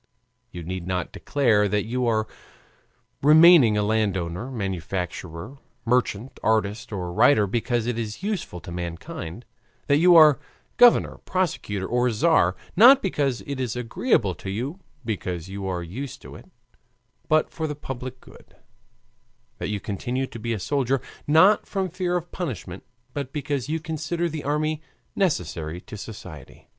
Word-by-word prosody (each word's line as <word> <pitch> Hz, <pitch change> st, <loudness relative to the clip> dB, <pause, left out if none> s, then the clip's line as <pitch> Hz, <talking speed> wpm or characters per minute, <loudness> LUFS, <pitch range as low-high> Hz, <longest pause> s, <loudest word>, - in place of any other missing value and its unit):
You 85 Hz, -1 st, -8 dB
need 90 Hz, +1 st, -5 dB
not 90 Hz, -1 st, -2 dB
declare 115 Hz, -8 st, +2 dB
that 105 Hz, +1 st, 0 dB
you 125 Hz, +2 st, -1 dB
are 110 Hz, -1 st, +1 dB, 0.9 s
remaining 150 Hz, -6 st, +7 dB
a 105 Hz, -, +2 dB
landowner, 100 Hz, -1 st, -1 dB
manufacturer, 95 Hz, -, -5 dB, 0.3 s
merchant, 120 Hz, 0 st, 0 dB
artist, 110 Hz, -1 st, 0 dB
or 90 Hz, -4 st, -4 dB
writer 110 Hz, +2 st, +5 dB
because 120 Hz, +3 st, -1 dB
it 120 Hz, -1 st, -2 dB
is 110 Hz, -, -5 dB
useful 200 Hz, -, -3 dB
to 85 Hz, -, -9 dB
mankind; 85 Hz, +3 st, -6 dB, 0.4 s
that 145 Hz, -, +3 dB
you 175 Hz, +1 st, +6 dB
are 155 Hz, -4 st, +8 dB, 0.4 s
governor, 245 Hz, -1 st, +5 dB
prosecutor, 155 Hz, -, -1 dB
or 125 Hz, +3 st, +1 dB
tzar, 160 Hz, +9 st, +3 dB, 0.2 s
not 255 Hz, +7 st, +8 dB
because 140 Hz, -, -1 dB
it 140 Hz, -2 st, -5 dB
is 125 Hz, -3 st, -2 dB
agreeable 120 Hz, -, +1 dB
to 95 Hz, -, -8 dB
you, 130 Hz, -, -4 dB, 0.3 s
because 90 Hz, -5 st, -4 dB
you 100 Hz, 0 st, -5 dB
are 90 Hz, -2 st, -2 dB
used 130 Hz, +10 st, -7 dB
to -, -, -11 dB
it, -, -, -14 dB, 0.8 s
but 155 Hz, 0 st, +2 dB
for 160 Hz, -1 st, -3 dB
the 150 Hz, -, -4 dB
public 130 Hz, -2 st, -7 dB
good; -, -, -18 dB, 1.0 s
that -, -, -3 dB
you 105 Hz, -1 st, -2 dB
continue 120 Hz, +7 st, -3 dB
to 120 Hz, -, -10 dB
be 115 Hz, +2 st, -3 dB
a 110 Hz, -, -1 dB
soldier, 135 Hz, +4 st, 0 dB, 0.3 s
not 160 Hz, +8 st, +5 dB
from 190 Hz, -2 st, -2 dB
fear 180 Hz, 0 st, -1 dB
of 175 Hz, 0 st, -7 dB
punishment, 150 Hz, -, -5 dB, 0.3 s
but 140 Hz, -2 st, -4 dB
because 140 Hz, -2 st, -3 dB
you 160 Hz, +1 st, -1 dB
consider 160 Hz, +2 st, -2 dB
the 155 Hz, -2 st, -5 dB
army 155 Hz, +1 st, -1 dB, 0.3 s
necessary 90 Hz, -, -1 dB
to 100 Hz, -, -11 dB
society. 90 Hz, -9 st, -10 dB
120 Hz, 150 wpm, -24 LUFS, 100-150 Hz, 1.0 s, are